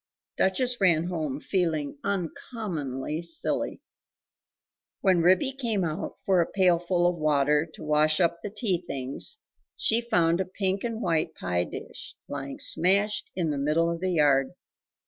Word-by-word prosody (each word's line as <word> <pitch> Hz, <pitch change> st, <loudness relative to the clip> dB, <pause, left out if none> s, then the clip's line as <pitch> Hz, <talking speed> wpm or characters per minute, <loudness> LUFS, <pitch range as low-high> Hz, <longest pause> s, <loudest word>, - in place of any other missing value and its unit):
Duchess 245 Hz, +5 st, 0 dB
ran 170 Hz, -4 st, +4 dB
home 155 Hz, -6 st, -3 dB
feeling 155 Hz, -6 st, -1 dB
uncommonly 165 Hz, -, -3 dB
silly! 170 Hz, -1 st, -1 dB, 1.2 s
When 185 Hz, -3 st, +4 dB
Ribby 185 Hz, +10 st, +4 dB
came 230 Hz, -7 st, -1 dB
out 160 Hz, +2 st, -3 dB
for 185 Hz, -3 st, +4 dB
a 165 Hz, -, -1 dB
pailful 175 Hz, -2 st, +2 dB
of 175 Hz, -1 st, 0 dB
water 150 Hz, 0 st, +2 dB
to -, -, -10 dB
wash 155 Hz, 0 st, +3 dB
up 170 Hz, -1 st, +2 dB
the 205 Hz, -, -4 dB
tea 200 Hz, -4 st, -1 dB
things, 135 Hz, -6 st, -3 dB, 0.4 s
she 225 Hz, +1 st, +1 dB
found 175 Hz, -7 st, +2 dB
a -, -, -1 dB
pink 190 Hz, +1 st, -2 dB
and 230 Hz, -1 st, -3 dB
white 160 Hz, -2 st, 0 dB
pie 90 Hz, 0 st, -1 dB
dish -, -, -9 dB
lying 135 Hz, 0 st, -5 dB
smashed 200 Hz, +5 st, +1 dB
in 170 Hz, -4 st, 0 dB
the 145 Hz, -, -2 dB
middle 160 Hz, +4 st, +2 dB
of 170 Hz, -, -3 dB
the 185 Hz, 0 st, -1 dB
yard. 145 Hz, -2 st, +3 dB
170 Hz, 145 wpm, -27 LUFS, 155-190 Hz, 1.2 s, ran